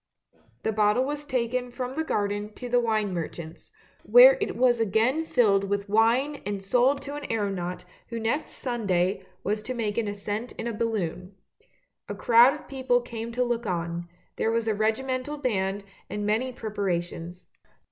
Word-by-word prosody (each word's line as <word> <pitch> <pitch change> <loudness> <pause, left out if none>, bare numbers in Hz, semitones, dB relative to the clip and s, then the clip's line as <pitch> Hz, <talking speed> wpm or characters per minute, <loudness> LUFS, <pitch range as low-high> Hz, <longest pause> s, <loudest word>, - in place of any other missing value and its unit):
The 220 - +1
bottle 215 +4 +2
was 295 +1 -4
taken 250 -1 -1
from 250 +1 -5
the 320 +3 -1
garden 205 -5 -2
to 250 - -7
the 245 0 +3
wine 215 -4 0
merchant's, 165 -1 -6 0.3
where - - +8
it - - -1
was 245 -1 +3
again 225 +9 +2
filled 200 -8 +3
with 200 0 -2
wine 235 +8 +2
and 200 -1 -4
sold 250 +7 +2
to 285 - -6
an 290 0 -5
aeronaut 195 -5 -2 0.2
who 230 0 -5
next 230 +7 -1
Sunday 195 -6 -1 0.2
was 210 +2 -1
to 255 +4 -5
make 220 -2 -1
an 225 - -1
ascent 205 +3 -4
in - - -6
a 235 - -2
balloon. 200 -4 -3 0.7
A - - -3
crowd 240 +4 +6
of 300 - -12
people 260 -2 +1
came 235 -1 -6
to 250 +1 +1
look 240 -2 -2
on; 170 -1 -3 0.3
there - - +1
was 230 0 0
a 220 - +2
regimental 255 +6 -1
band 200 -7 -1 0.3
and 210 0 -3
many 225 +5 +1
preparations. 180 -6 -4
225 Hz, 165 wpm, -26 LUFS, 200-250 Hz, 0.7 s, where